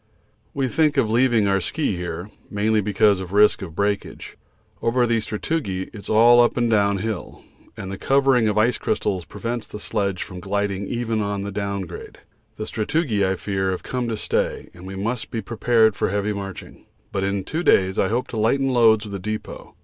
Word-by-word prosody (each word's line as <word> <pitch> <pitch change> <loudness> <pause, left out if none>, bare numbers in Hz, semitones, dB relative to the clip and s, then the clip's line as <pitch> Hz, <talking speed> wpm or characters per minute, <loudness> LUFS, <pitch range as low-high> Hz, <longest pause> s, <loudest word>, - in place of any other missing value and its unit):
We 135 -2 0
think 150 +1 +2
of 115 -5 +2
leaving 120 -3 +3
our 95 -1 +2
ski 125 - -1
here, 85 +2 -5 0.2
mainly 105 +1 +1
because 100 0 +3
of 95 0 -7
risk 105 +1 +5
of 85 -5 -7
breakage. 100 +1 -2 0.5
Over 120 +1 +2
the 115 -1 +1
sastrugi 105 - -2
it - - -12
is 100 - -8
all 120 +2 +7
up 120 - +2
and 120 -1 +1
down 100 -2 +3
hill, 110 -1 -5 0.3
and 95 - -6
the 95 - -6
covering 135 -4 +3
of 105 0 0
ice 115 +2 +3
crystals 95 -4 -1
prevents 120 -1 -5
the - - -8
sledge 100 -4 -2
from 90 - -9
gliding 100 +1 -2
even 115 -2 -1
on 100 -1 -2
the 100 - -4
down 100 0 -2
grade. 90 -2 -9 0.4
The 110 - -5
sastrugi, 110 -1 0
I 95 0 +1
fear, 95 0 -2
have 95 - -3
come 125 -2 -3
to 115 -2 -2
stay, - - -1
and 90 +1 -11
we 95 - -7
must 110 +4 -3
be 115 - -3
prepared 110 0 +2
for - - 0
heavy 105 +1 -1
marching, 100 -2 -8 0.2
but 95 - -1
in 100 0 -1
two 160 - -3
days 95 - +3
I - - +3
hope 120 +5 -1
to 115 - -5
lighten 135 +5 +2
loads 115 -4 +4
with 100 - -8
a 100 - -3
depot. 110 +3 -6
105 Hz, 205 wpm, -22 LUFS, 100-115 Hz, 0.5 s, all